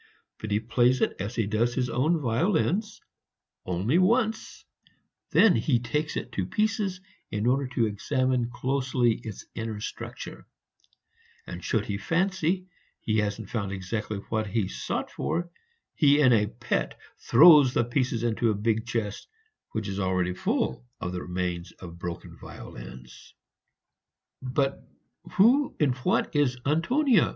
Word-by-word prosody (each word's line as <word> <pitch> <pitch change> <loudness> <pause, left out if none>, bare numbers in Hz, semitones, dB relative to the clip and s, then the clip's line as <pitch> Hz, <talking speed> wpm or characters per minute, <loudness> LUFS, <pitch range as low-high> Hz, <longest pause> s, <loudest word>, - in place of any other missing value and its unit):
But 110 - -5
he 105 0 +2
plays 120 +3 +2
it - - +1
as 100 +5 -4
he 115 - +1
does 110 +4 0
his 125 -2 0
own 150 +8 +1
violins, 175 - 0 0.7
only 95 - +1
once; 220 +3 +1 0.6
then 220 -6 +5
he 135 -6 +2
takes 150 +6 -2
it - - -5
to 95 -5 -2
pieces 210 - -1 0.3
in 105 +1 -2
order 135 +2 +2
to 115 - +3
examine 125 +3 0
closely 125 -1 +1
its 110 -4 -8
inner 110 -2 -4
structure, - - -7 1.0
and 90 0 -8
should 110 -2 0
he 100 -1 -3
fancy 185 - 0 0.3
he 110 -1 0
hasn't 105 0 -3
found 100 -4 -2
exactly 105 +3 -3
what 110 -1 -1
he 100 -1 0
sought - - -4
for, 170 0 -2 0.4
he 145 -1 +4
in 130 -4 +6
a 105 -2 +3
pet 120 +3 -2 0.2
throws 150 -6 +7
the - - +3
pieces 120 -1 -1
into 115 0 +1
a 110 - +1
big 110 +2 0
chest, 110 -4 -3 0.5
which 110 -2 -2
is 100 0 -3
already 90 -1 0
full 65 -7 -1 0.2
of 90 - -3
the 90 -1 -4
remains 90 -1 -3
of 85 -2 -11
broken 85 -1 -6
violins." 60 +1 -11 1.1
"But 135 +2 -1 0.5
who 250 +8 +4
and 140 -5 +2
what 125 - 0
is 135 -4 +2
Antonia?" 210 - +3
120 Hz, 145 wpm, -27 LUFS, 105-150 Hz, 1.1 s, throws